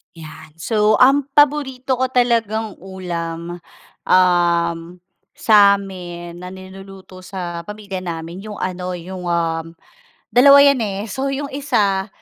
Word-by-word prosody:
'Yan, 155 -1 -12
so 210 +5 +1
ang 275 +2 +5
paborito 265 -3 +2
ko 260 - +1
talagang 230 -4 0
ulam, 175 -2 -6 0.5
uhm, 170 -2 +3 0.6
sa 205 -2 +6
amin 175 -3 -9
na 180 - -8
niluluto 190 0 -12
sa 175 -2 -6
pamilya 205 -2 -6
namin 170 0 -6
'yung 210 -1 -8
ano 180 0 -4
'yung, 180 +1 -8
um, 165 -1 -2 0.6
dalawa 280 +3 +7
'yan, 280 -3 +4
eh, 200 -1 -3
so 265 +7 -2
'yung 280 +1 -4
isa 205 -8 0
190 Hz, 125 wpm, -19 LUFS, 175-225 Hz, 0.6 s, dalawa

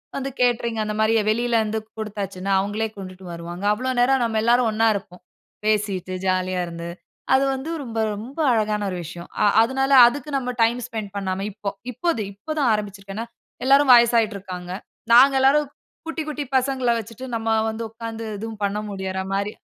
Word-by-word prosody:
வந்து 275 0 -3
கேட்டரிங் 235 -2 +1
அந்த 210 0 -3
மாரி 220 +1 +3 0.2
வெளியில 235 +2 +1
வந்து 220 +1 -2 0.2
குடுத்தாச்சுன்னா 200 -3 -4
அவங்களே 210 +3 -1
கொண்டுட்டு 185 -1 -9
வருவாங்க. 170 +3 -7
அவ்வளோ 255 +4 -2
நேரம் 260 +1 +3
நம்ம 225 -1 0
எல்லாரும் 240 +1 +4
ஒன்னா 225 +1 +2
இருப்போம். 180 -2 -7 0.4
பேசிட்டு 200 -4 0
ஜாலியா 185 0 0
இருந்து. 170 0 -7 0.4
அது 265 +1 +5
வந்து 265 +4 -5
ரொம்ப, 230 -3 -4 0.2
ரொம்ப 240 +9 -8
அழகான 210 -2 0
ஒரு 180 - -4
விஷயம். 170 +1 -9
அ - - +5 0.2
அதனால 270 +3 0 0.2
அதுக்கு 290 +4 -3
நம்ம 250 -2 -3
டைம் 235 +2 +2
ஸ்பெண்ட் 215 -4 -5
பண்ணாம 195 0 -2
இப்போ, 205 0 -4 0.2
இப்போ, 345 +9 -2 0.2
இப்போ 200 +10 -9
தான் 265 - +3
ஆரம்பிச்சுருக்கேன் 200 -1 -5
ஏனா, 230 - -6 0.4
எல்லாரும் 275 0 +6
வயசாகிட்டு 235 -3 +5
இருக்காங்க. 180 -2 -7 0.4
நாங்க 270 +3 +8
எல்லாரும் 280 +2 +4 0.4
குட்டி, 330 0 -3
குட்டி 295 -1 -3
பசங்கள 260 -2 +1
வச்சுட்டு 230 +3 -8
நம்ம 225 0 -2 0.2
வந்து 220 +1 -4
உட்கார்ந்து 225 0 -7
எதுவும் 220 0 -7
பண்ண 200 +1 -2
முடியிற 190 -1 -4
மாரி 200 +2 -1
220 Hz, 170 wpm, -23 LUFS, 195-245 Hz, 0.4 s, நாங்க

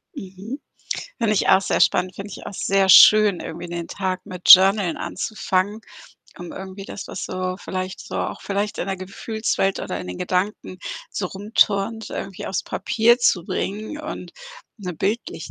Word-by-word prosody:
Mhm. 195 +8 -8 0.6
Finde 225 -3 +1
ich - - +1
auch 190 - +6
sehr - - -1
spannend, 185 0 +2
finde 200 +1 -8
ich - - -9
auch - - -6
sehr 195 0 +1
schön, 210 0 +8
irgendwie 170 +2 -7
den 170 -1 -5
Tag 185 -2 -3
mit 180 -1 -7
Journalen 190 -1 +6
anzufangen, 210 -1 -2 0.6
um 175 -1 -8
irgendwie 190 +1 -8
das, 200 - -8
was - - -5
so 185 0 -3
vielleicht 185 -1 -5
so - - -7
auch - - -3
vielleicht 200 +1 -2
in - - -2
der 195 -1 -2
Gefühlswelt 195 +1 -2
oder - - -4
in - - -8
den 90 - -6
Gedanken 185 0 -2 0.3
so 185 - -3
rumturnt, 205 +2 0
irgendwie 195 -2 -6
aufs 190 - -2
Papier 235 +2 +2
zu 180 -8 +2
bringen 215 +12 -4
und 310 0 -7 0.5
na, 185 -3 -5
bildlich 205 +8 -3
195 Hz, 165 wpm, -22 LUFS, 185-210 Hz, 0.6 s, schön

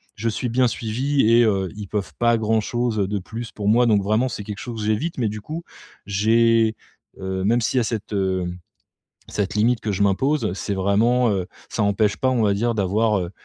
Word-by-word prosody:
je 115 +2 -1
suis 120 +2 -3
bien 125 +1 +3
suivi 120 +2 0
et 120 +1 +6
heu, 95 -4 +1
ils 105 -2 -6
peuvent 105 -1 -3
pas 115 -1 +3
grand 110 0 +1
chose 120 0 -1
de 100 0 0
plus 115 +5 -7
pour 105 -1 -5
moi. 120 +3 +5
Donc 105 -3 +3
vraiment 110 +5 +1
c'est 105 - -6
quelque 105 0 -6
chose 115 -3 -6
que 105 - -2
j'évite 135 +8 -1
mais 110 -3 +1
du 105 0 -6
coup 160 +8 -6 0.4
j'ai 115 +2 +3 0.4
heu, 95 0 -3
même 115 +4 +2
s'il 130 - 0
y - - +4
a - - +1
cette, 110 -2 -4
hem, 95 -2 -1 0.7
cette 100 0 -2
limite 115 +2 +2
que 105 - -2
je 100 +1 0
m'impose. 130 +3 +1
C'est 100 +1 -3
vraiment, 110 +6 +2
heu, 95 -2 -1 0.2
ça - - -2
empêche 100 0 +2
pas 130 - +1
on 120 -4 +1
va 100 - +3
dire 115 +3 0
d'avoir, 105 +2 +1
heu, 90 0 -4
110 Hz, 220 wpm, -22 LUFS, 100-120 Hz, 0.7 s, et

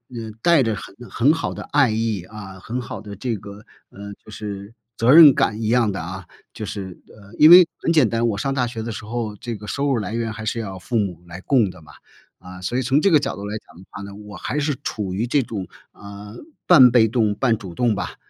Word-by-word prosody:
嗯， 110 -2 -7
带 170 -2 +4
着 110 -2 -1
很 100 - -10
很 135 +6 +3
好 160 - -3
的 - - -7
爱 145 -4 +4
意， 110 -4 -2
啊， 95 -1 -11
很 115 +7 -5
好 115 - -8
的 105 -1 -9
这 115 +3 -3
个， 100 +1 -11 0.3
嗯 100 +1 -9
就 110 - -14
是 100 0 -7 0.2
责 115 +3 +3
任 155 -3 +9
感 110 -2 0
一 110 - -2
样 115 -2 +2
的 95 - -5
啊。 95 +3 -7 0.3
就 110 - -6
是， 95 -4 -7
呃， 100 0 -17
因 155 - +7
为， 175 -1 +9
很 - - -1
简 155 -7 +4
单， 115 +1 0
我 105 -3 -2
上 135 +5 -2
大 130 -2 0
学 115 -2 -6
的 115 - -5
时 105 - -8
候， 110 -2 -4
这 115 +3 -6
个 105 0 -11
收 140 - -2
入 135 - +1
来 105 -1 -4
源 115 -1 -2
还 110 0 -8
是 115 - -2
要 100 -4 -6
父 115 +6 -3
母 95 -5 -2
来 85 +1 -9
供 120 -3 +2
的 90 - -13
嘛。 75 - -16 0.5
啊， 90 0 -11
所 90 +7 -4
以 130 - +1
从 135 +4 +2
这 195 +3 +2
个 155 - +6
角 145 - -3
度 100 - -7
来 105 +1 -5
讲 - - -18
的 90 - -14
话 100 - -8
呢， 100 0 -9
我 105 0 -11
还 145 - -4
是 145 -1 -1
处 100 -4 -4
于 110 +6 -2
这 135 +1 +1
种， 100 -5 -6 0.2
呃， 100 +1 -11 0.3
半 135 -8 +8
被 115 -2 +4
动 110 -2 0
半 120 -2 +1
主 95 -6 -10
动 120 +1 +1
吧。 90 -3 -5
110 Hz, 270 characters per minute, -21 LUFS, 100-125 Hz, 0.5 s, 任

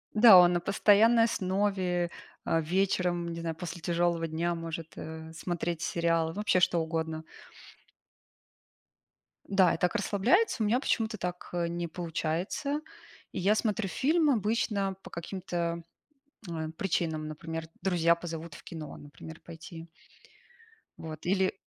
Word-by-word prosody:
да, 215 -2 +9
он 175 0 +7
на 175 - +1
постоянной 215 +4 +5
основе, 185 -4 0 0.3
а, 165 - +2
вечером, 180 0 0
н - - -4
не 165 - -5
знаю, 165 -1 -3
после 175 0 -6
тяжелого 170 -1 0
дня 170 +2 -1
может, 165 -1 -5
э, 160 0 -8
смотреть 170 0 -3
сериалы, 165 -1 +1
вообще 205 -3 +2
что 175 -1 +3
угодно. 160 -1 -3 2.3
Да, 190 -3 +4
и - - -4
так 180 +5 +1
расслабляется. 230 - +2
У - - +2
меня 230 +4 +3
почему-то 220 -5 0
так, 180 0 -5
э, 175 -1 0
не 170 0 -3
получается. 175 - -2 0.5
И - - -4
я 200 +4 +4
смотрю 215 -2 0
фильм 310 - +2
обычно 210 -4 0
по - - -11
каким-то, 170 -1 -3 0.7
э, 160 -1 -3
причинам. 160 -4 -1
Например, 160 +1 -6 0.2
друзья 170 -3 +3
позовут 165 -2 -7
в - - -12
кино, 160 -3 -8
например, 145 +3 -11
пойти. 165 0 -10 1.1
Вот, 155 -1 -8
или 190 +1 +2
175 Hz, 135 wpm, -29 LUFS, 165-195 Hz, 2.3 s, да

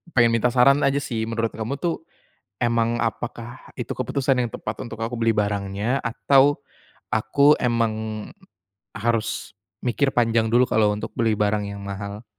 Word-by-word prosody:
pengen 120 -2 +5
minta 115 +2 +2
saran 140 +3 +5
aja 140 +1 +2
sih 110 -3 -2
menurut 115 0 -1
kamu 115 +5 -3
tuh, 170 -2 -2 0.6
emang 115 0 +1
apakah 120 +2 -4 0.2
itu 120 - -3
keputusan 130 +1 0
yang 120 -2 -1
tepat 110 - -5
untuk 115 -1 -7
aku 115 +2 -2
beli 115 0 +3
barangnya 100 +4 -1
atau, 135 +4 +3 0.6
aku 140 +7 +4
emang, 110 -3 -1 0.7
harus 115 -1 -2 0.3
mikir 135 +3 +1
panjang 115 -2 +2
dulu 125 +2 +5
kalau 105 -1 +3
untuk 105 - -6
beli 115 -2 +2
barang 105 0 +1
yang 100 0 -8
mahal? 100 +2 -6
115 Hz, 150 wpm, -23 LUFS, 110-125 Hz, 0.7 s, pengen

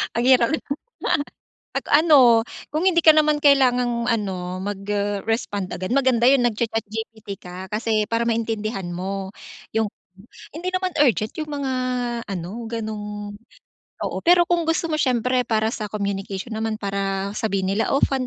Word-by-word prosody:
Ang 235 +1 +1
hirap 255 +1 +5
naman. 290 -2 -3 1.0
At - - -4 0.2
ano, 255 -8 +6 0.3
kung 310 - 0
hindi 340 - -2
ka 315 - +10
naman 305 -1 +3
kailangang 250 -4 +3
ano, 185 -5 -2
mag-respond 205 0 -2
agad. 185 +5 -3
Maganda 255 -3 +3
'yong 265 -1 +6
nagcha-ChatGPT 220 -2 -4
ka. 180 +1 -9
Kasi 215 0 0
para 230 0 0
maintindihan 220 -4 -2
mo 190 +2 -4 0.4
'yong 220 0 +1 0.7
hindi 345 +4 -4
naman 370 0 0
urgent 235 -6 +3
'yong 305 -1 -4
mga 265 -1 -1 0.5
ano, 180 -4 -5 0.2
ganong 210 -2 -5 0.7
oo, - - -3
pero 350 0 +7
kung 340 -2 +2
gusto 325 0 0
mo 310 - 0
siyempre 250 -2 +1
para 220 -1 +1
sa 215 -2 -4
communication 200 +1 -4
naman 220 0 -2
para 195 0 -2
sabihin 200 -3 -1
nila, 220 +6 0
"Oh, 275 - +1
fun 265 -2 +1
225 Hz, 145 wpm, -22 LUFS, 200-255 Hz, 1.0 s, ka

